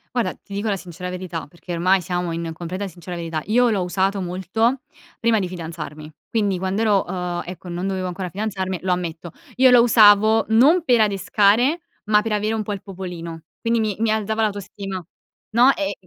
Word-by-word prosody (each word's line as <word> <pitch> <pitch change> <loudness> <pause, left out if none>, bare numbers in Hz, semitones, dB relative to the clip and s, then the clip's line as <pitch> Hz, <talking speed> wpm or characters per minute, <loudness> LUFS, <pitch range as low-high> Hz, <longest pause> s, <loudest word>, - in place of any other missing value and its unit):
Guarda, 240 - 0
ti 200 - -14
dico 205 +2 -1
la 200 - +1
sincera 180 -1 -7
verità, 180 -3 -5
perché 170 +4 -11
ormai 185 +3 +3
siamo 175 0 -2
in 165 0 -3
completa 180 +4 -5
sincera 175 0 -8
verità, 165 -2 -4
io 240 +3 +3
l'ho 200 -5 0
usato 190 +2 0
molto 190 +8 0 0.4
prima 230 -1 +3
di 185 - -1
fidanzarmi, 160 -3 -7 0.2
quindi 205 -4 +1
quand'ero 195 +2 +1
uhm, 180 -1 -3
ecco 180 0 -8
non 175 +2 -3
dovevo 190 -1 -2
ancora 180 0 -4
fidanzarmi, 190 -1 -3
lo 185 - -1
ammetto. 170 -1 -3 0.3
Io 260 0 +6
lo 245 -1 +7
usavo, 220 -1 +6
non 285 +10 +5
per 245 -7 +4
adescare, 210 - +3 0.2
ma 210 0 +3
per 225 - -3
avere 210 +1 0
un 220 - -2
po' 205 0 -3
il 195 - -6
popolino, 175 -4 -7 0.2
quindi 230 0 +1
mi 215 -2 0
mi 225 - +1
alzava 220 +1 0
l'autostima. 195 -2 -3 0.5
No, 245 +5 +6
e 195 0 -2
195 Hz, 185 wpm, -22 LUFS, 180-220 Hz, 0.5 s, lo